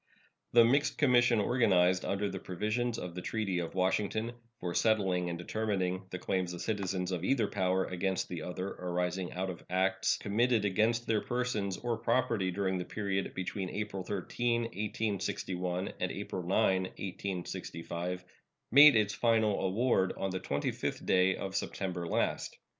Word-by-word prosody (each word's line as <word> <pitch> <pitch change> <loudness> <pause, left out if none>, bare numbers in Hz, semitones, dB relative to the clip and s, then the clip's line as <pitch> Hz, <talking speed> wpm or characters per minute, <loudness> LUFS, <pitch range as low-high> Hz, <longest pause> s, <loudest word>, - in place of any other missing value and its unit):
The 120 -1 +8
mixed 140 +5 +2
commission 120 -4 +4
organized 95 -6 +3
under 100 +1 0
the 95 -1 -4
provisions 110 +7 -2
of 90 -5 -5
the 90 - -5
treaty 100 -3 -1
of 85 0 -4
Washington 105 +4 0 0.3
for 90 -1 -3
settling 95 -5 +2
and 85 - -3
determining 95 -1 -2
the 90 - -4
claims 90 -1 -1
of 85 - -5
citizens 95 -3 -2
of 90 -2 -2
either 120 +2 +2
power 95 -1 +1
against 95 +1 -1
the 85 -3 -5
other 90 +3 -4
arising 90 0 -2
out 95 +1 -2
of 85 - -10
acts 95 +1 +1
committed 110 +1 +1
against 110 +4 +2
their 110 -2 +1
persons 120 -6 -1
or 120 -2 -2
property 115 -5 +1
during 95 0 -1
the - - -2
period 95 0 -2
between 95 0 -3
April 100 -2 -4
13, 115 +5 -1
1861, 100 -4 -2
and - - -1
April 95 - -4
9, 90 +2 0 0.2
1865, 90 -2 -5 0.5
made 145 +3 +9
its 105 -2 +2
final 110 -2 +2
award 95 0 +2
on 95 - -2
the 95 - -2
25th 70 -4 -2
day 95 0 +4
of 95 0 -5
September 90 -3 -3
last. - - -1
95 Hz, 155 wpm, -32 LUFS, 90-110 Hz, 0.5 s, made